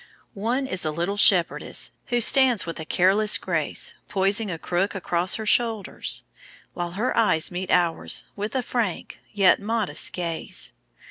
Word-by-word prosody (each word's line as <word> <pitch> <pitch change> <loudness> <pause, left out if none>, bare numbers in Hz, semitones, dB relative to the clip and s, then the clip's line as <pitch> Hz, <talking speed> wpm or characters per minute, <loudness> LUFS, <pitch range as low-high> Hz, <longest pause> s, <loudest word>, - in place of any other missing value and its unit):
One 235 +7 -2
is 185 -8 -3
a 155 - 0
Little 170 +6 -2
Shepherdess, 190 -4 +3 0.2
who 240 -1 0
stands 250 -2 +5
with 165 -1 -6
careless 200 +4 +3
grace - - -1
poising 200 +2 +1
a 170 - -4
crook 180 +5 -2
across 180 -1 0
her 220 - -5
shoulders, 225 -2 0 0.5
while 175 -1 -5
her 220 +7 -1
eyes 185 -8 +2
meet 180 +1 -5
ours 175 -2 +1
with 210 +3 -5
a 260 - 0
frank 230 -7 -3
yet 195 -3 +4
modest 220 -1 -1
gaze. 170 -2 -4
195 Hz, 145 wpm, -24 LUFS, 175-225 Hz, 0.5 s, stands